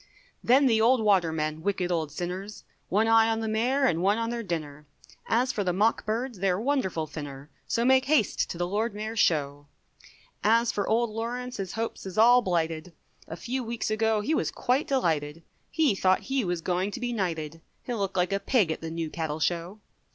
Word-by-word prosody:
Then 265 +4 +5
the 225 -4 +3
old 245 +3 +4
watermen, 160 -6 +1
wicked 185 -1 -1
old 160 -4 -1
sinners, 180 +6 -6 0.3
One 215 +4 +2
eye 225 0 +5
on 225 0 0
the 225 - -3
Mayor 245 +6 +1
and 170 -9 +1
one 200 +3 +2
on 230 0 -2
their 240 -1 -3
dinner, 150 -7 -5 0.4
As 245 +3 +2
for 205 - -2
the 180 -2 0
mock 215 +4 +1
birds, 230 0 -2
they're 185 -1 +1
wonderful 220 - -1
thinner, 145 -2 -8 0.2
So 235 - 0
make 260 +1 +4
haste 275 -7 +1
to - - -5
the 175 - -1
Lord 210 +3 -1
Mayor's 215 +1 -4
Show. 145 -4 +1 0.8
As 230 +2 +3
for 205 - -2
Old 230 0 +1
Lawrence 245 +3 -4
his 190 -2 -5
hopes 225 -3 -4
is 185 - -8
all 240 +3 +7
blighted. 165 -3 -2 0.3
A 165 - -6
few 255 +7 -3
weeks 230 -1 -3
ago 220 0 +1
he 260 +10 -1
was - - 0
quite 260 +3 0
delighted, 165 - -1 0.3
He 310 -8 +2
thought 185 -1 +2
he 270 -1 -1
was 175 -3 -2
going 180 +3 -1
to - - -6
be 245 -1 -2
knighted, 165 -6 -3 0.2
He'll 240 -3 -4
look 195 -1 -2
like 180 +1 +1
a 195 - +1
pig 200 - +2
at - - -4
the 165 - -5
New 165 -1 -4
Cattle 160 -2 -3
Show. 175 +5 -2
205 Hz, 205 wpm, -27 LUFS, 170-230 Hz, 0.8 s, all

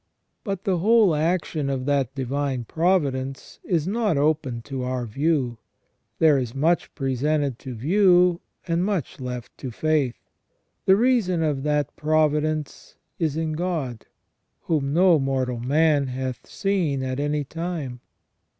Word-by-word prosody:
But 195 -4 -4
the 185 -3 +1
whole 215 -1 +5
action 155 -2 0
of 130 -2 -2
that 135 -2 0
divine 135 -1 -2
providence 140 - -1
is 165 -4 0
not 210 -5 +1
open 140 -5 0
to 135 0 -5
our 125 -1 -2
view; 130 -1 0 0.6
there 155 -4 +5
is 125 -2 -4
much 165 +5 +1
presented 140 -1 0
to 130 -2 -7
view, 180 - +4 0.3
and 170 +1 +1
much 190 -9 -2
left 125 -2 -6
to 130 - -5
faith. 145 0 0 0.7
The 190 - +7
reason 210 -7 +2
of 145 -4 0
that 150 -1 0
providence 155 -1 0 0.2
is 155 -3 0
in 160 -1 -1
God, 155 -9 -3 0.5
whom 145 -4 -1
no 175 0 +5
mortal 130 -3 -1
man 145 +2 +2
hath 130 -1 -5
seen 175 -9 -1
at 130 0 -3
any 145 0 0
time. 160 -4 -5
150 Hz, 135 wpm, -24 LUFS, 130-170 Hz, 0.7 s, The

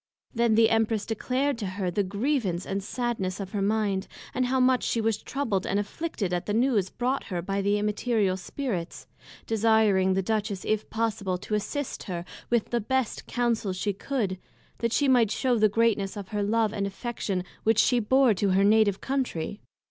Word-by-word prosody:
Then 235 -2 +3
the 225 0 +5
Empress 225 -1 +1
declared 255 +4 -1
to 205 - -3
her 185 -1 -2
the 205 - +1
grievance 200 - -1
and 195 +1 -2
sadness 215 -5 -2
of 190 -1 -5
her 205 - -2
mind, 200 -1 0 0.3
and 255 -1 +1
how 260 +1 +1
much 255 0 +3
she 230 - 0
was 220 -1 +1
troubled 230 -9 -2
and 200 - 0
afflicted 205 - -3
at 175 - -2
the 205 - 0
News 225 -6 +2
brought 255 +3 -1
her 180 -4 -3
by 195 +3 -2
the 200 +1 +2
Immaterial 210 -1 +1
Spirits, 190 -3 -4 0.4
desiring 215 -4 +3
the 190 - +1
Duchess, 210 -2 -2
if 215 -1 -1
possible, 220 -5 -1
to 200 - -7
assist 245 +7 -2
her 175 -3 -4 0.2
with 235 -2 +1
the 240 -1 +1
best 260 +2 -1
Counsels 230 -6 0
she 205 +2 -1
could, 200 -4 -2 0.4
that 230 -1 0
she 285 +4 +2
might 245 -5 +4
shew 245 +1 +1
the 215 0 +5
greatness 210 -2 +1
of 200 -2 -7
her 210 -1 -2
love 215 +1 +1
and 200 -2 -1
affection 200 -3 -3 0.2
which 225 0 +3
she 245 +2 +4
bore 255 +2 +4
to 200 +1 0
her 195 +1 +4
Native 205 -1 +4
Countrey. 245 -9 -2
215 Hz, 185 wpm, -27 LUFS, 195-235 Hz, 0.4 s, the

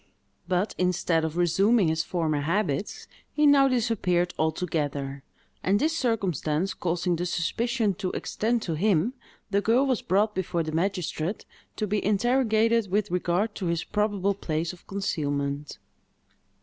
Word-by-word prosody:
But, 185 +3 0
instead 180 -2 +1
of 160 +1 -3
resuming 195 +4 +3
his 160 0 +1
former 160 -5 -1
habits, 170 +2 -1 0.3
he 300 - +2
now 280 -1 +6
disappeared 215 -8 +1
altogether; 145 -4 -1 0.4
and 195 +2 +2
this 320 +3 +1
circumstance 190 - 0
causing 175 0 -1
the 175 +2 -2
suspicion 225 +5 0
to 190 -3 -1
extend 230 +1 -1
to 170 - -2
him, 195 +5 +2 0.4
the 200 0 +2
girl 235 +6 +3
was 260 -4 0
brought 210 +3 +1
before 175 -3 -1
the 155 - -4
magistrate 180 +1 -2 0.3
to 215 - -1
be 210 0 -1
interrogated 225 0 +2
with 200 -1 0
regard 180 +4 0
to 190 - -4
his 170 -1 0
probable 205 -2 0
place 165 -3 -3
of 180 - -17
concealment. 145 -7 -2
185 Hz, 140 wpm, -26 LUFS, 165-215 Hz, 0.4 s, now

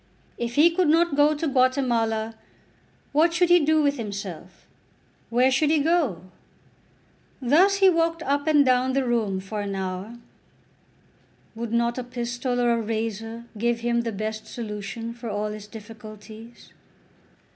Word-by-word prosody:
If 235 0 -3
he 320 +4 +6
could 350 0 +1
not 325 0 +3
go 295 +1 +4
to 315 +2 -2
Guatemala, 240 -5 +1 0.8
what 330 +3 +3
should 355 0 +3
he 350 0 +7
do 310 0 +2
with 285 0 +1
himself; 195 -5 -7 0.6
where 250 +3 +3
should 290 +3 +2
he 315 - +3
go? 295 - +1 1.2
Thus 320 +10 +4
he 390 -1 +4
walked 330 -1 0
up 285 +2 -1
and 295 -2 +5
down 255 0 +2
the 270 0 +1
room 220 -6 0
for 205 +2 -5
an 200 -1 -4
hour. 190 +4 -5 1.4
Would 230 0 -5
not 235 +1 0
a - - -3
pistol 245 0 -3
or 240 -1 +2
a 230 -1 +1
razor 225 +1 -4
give 235 +1 0
him 235 0 +1
the 230 -1 -3
best 215 +1 -5
solution 220 0 -6
for 235 -1 -7
all 210 0 -2
his 210 -1 -8
difficulties? 220 +1 -12
235 Hz, 150 wpm, -24 LUFS, 220-285 Hz, 1.4 s, he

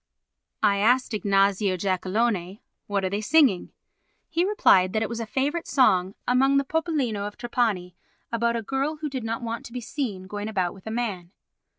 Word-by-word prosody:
I 200 -2 +4
asked 245 +4 +2
Ignazio 200 -2 +2
Giacalone: 190 +1 -1 0.3
"What 200 -2 -1
are - - 0
they 205 +1 -1
singing?" 255 - +3 0.6
He 340 +1 0
replied 190 - +4
that 220 0 +1
it - - -3
was 235 0 -4
a 230 - -4
favourite 290 +8 -1
song 190 -8 +3
among 270 +3 +4
the 275 - +3
popolino 275 -10 -1
of 205 - -10
Trapani 215 -7 -1 0.4
about 235 0 +1
a 230 - -2
girl 270 +6 -1
who 305 0 -4
did 260 -3 -4
not 230 +1 -3
want 230 0 -4
to 235 - -15
be 250 - -3
seen 230 -6 -4
going 205 +2 -5
about 185 -5 -1
with 195 +1 -15
a - - -2
man. 215 -7 -3
225 Hz, 185 wpm, -25 LUFS, 195-255 Hz, 0.6 s, I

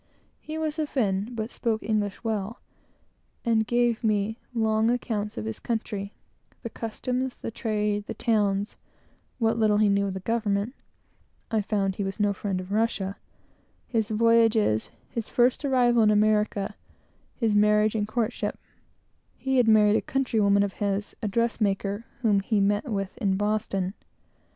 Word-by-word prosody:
He 310 +1 -6
was 315 0 -2
a 305 - 0
Fin, 205 -7 0
but 225 +1 -4
spoke 225 -3 -1
English 210 -2 0
very 225 -1 0
well, 210 +3 -4 0.9
and 220 -2 +2
gave 240 0 +1
me 215 +1 0
long 220 -1 +2
accounts 220 -4 -2
of 105 - -3
his 110 - -4
country; 210 -3 -3 0.5
the 230 - -5
customs, 250 +3 -3
the - - -5
trade, 210 -2 -1
the - - -5
towns, 205 -2 0 0.6
what 230 -1 +1
little 215 -2 +3
he 210 -1 +4
knew 200 0 +2
of 190 - -4
the - - -3
government, 210 +1 -1 0.8
(I 220 -1 +2
found 200 -2 -1
he 200 - -1
was 195 +2 -4
no 205 -1 +2
friend 195 -1 -3
of 185 +1 -8
Russia), 205 -3 0 0.7
his 220 -4 -1
voyages, 225 - +3 0.2
his 230 -2 -5
first 245 +4 +2
arrival 245 -4 +3
in 215 - +5
America, 210 -1 +2 0.6
his 225 -4 +1
marriage 210 +1 +4
and 210 -2 -1
courtship; 230 +1 -2 0.8
he 265 0 0
had 245 -2 +4
married 215 -1 +5
a - - 0
countrywoman 215 -7 +2
of 200 -1 -2
his, 200 0 -1
a 215 - -1
dress 230 +3 0
maker, 200 +1 0 0.2
whom 210 -3 +4
he 205 +2 0
met 205 +6 +1
with 195 -3 -3
in 195 -2 +1
Boston. 200 -2 -1
215 Hz, 160 wpm, -26 LUFS, 200-230 Hz, 0.9 s, in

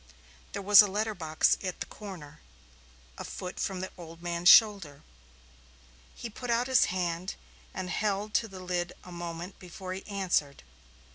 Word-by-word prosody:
There 200 - -4
was 205 +1 +9
a 205 - +2
letterbox 190 -6 +1
at 185 -2 -4
the - - -3
corner, 170 -8 -10 0.8
a - - -4
foot 180 0 -7
from 190 -2 -2
the 185 - -5
older 165 -1 -10
man's 175 0 +2
shoulder. 195 -11 +6 1.1
He - - -6
put 240 +3 -8
out 235 +1 +2
his 260 0 +4
hand 180 0 -2 0.4
and 185 -1 -5
held 205 +3 -1
to 225 - +2
the 190 -3 -10
lid 180 -1 -2
a 180 - -11
moment 175 +1 -7
before 185 +1 -7
he 190 - -7
answered. 180 - -1
185 Hz, 155 wpm, -29 LUFS, 175-205 Hz, 1.1 s, was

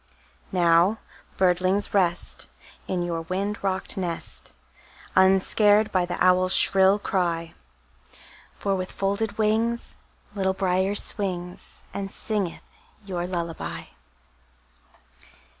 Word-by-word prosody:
Now, 175 +3 +4 0.4
birdlings, 185 +2 +1
rest, 180 -3 0 0.4
In 180 -2 -1
your 170 -1 -2
wind 195 +5 -3
rocked 190 0 -1
nest, 175 -3 -5 0.6
Unscared 205 +3 +4
by 180 -2 +1
the 175 - -3
owl's 185 0 +4
shrill 190 +1 +5
cry; 170 -5 -1 1.0
For 200 - -1
with 185 -1 -3
folded 200 +2 -2
wings 225 +2 0 0.4
Little 190 -2 0
Brier 190 +1 +1
swings, 180 -4 -4
And 195 -1 -4
singeth 200 -4 -3 0.4
your 175 -3 -3
lullaby. 170 -2 -4
190 Hz, 95 wpm, -25 LUFS, 180-200 Hz, 1.0 s, shrill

